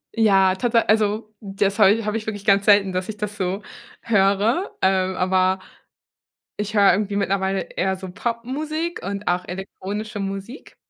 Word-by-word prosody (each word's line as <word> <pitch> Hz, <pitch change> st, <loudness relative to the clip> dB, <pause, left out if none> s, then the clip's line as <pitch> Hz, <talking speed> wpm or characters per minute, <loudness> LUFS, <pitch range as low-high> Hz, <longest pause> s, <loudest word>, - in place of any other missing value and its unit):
Ja, 195 Hz, -4 st, +4 dB
tatsa 235 Hz, +3 st, +2 dB
also, 215 Hz, 0 st, +1 dB
das 200 Hz, 0 st, -1 dB
habe 200 Hz, -3 st, +6 dB
ich 225 Hz, 0 st, 0 dB
habe 210 Hz, +1 st, -1 dB
ich 215 Hz, -, -6 dB
wirklich 205 Hz, -2 st, -5 dB
ganz 200 Hz, 0 st, +4 dB
selten, 200 Hz, -2 st, +5 dB
dass 185 Hz, +2 st, -3 dB
ich 215 Hz, -, -5 dB
das 210 Hz, 0 st, -5 dB
so 190 Hz, +2 st, -2 dB, 0.4 s
höre, 210 Hz, -, +1 dB
ähm, 190 Hz, 0 st, +2 dB
aber 185 Hz, 0 st, +2 dB, 1.0 s
ich 210 Hz, +1 st, -4 dB
höre 200 Hz, -1 st, +6 dB
irgendwie 200 Hz, +2 st, -1 dB
mittlerweile 195 Hz, 0 st, 0 dB
eher 190 Hz, 0 st, -2 dB
so 185 Hz, 0 st, -8 dB
Popmusik 275 Hz, -, -3 dB
und 200 Hz, +1 st, -5 dB
auch 180 Hz, +1 st, 0 dB
elektronische 200 Hz, +3 st, -6 dB
Musik. 195 Hz, +6 st, -6 dB
200 Hz, 160 wpm, -22 LUFS, 190-215 Hz, 1.0 s, habe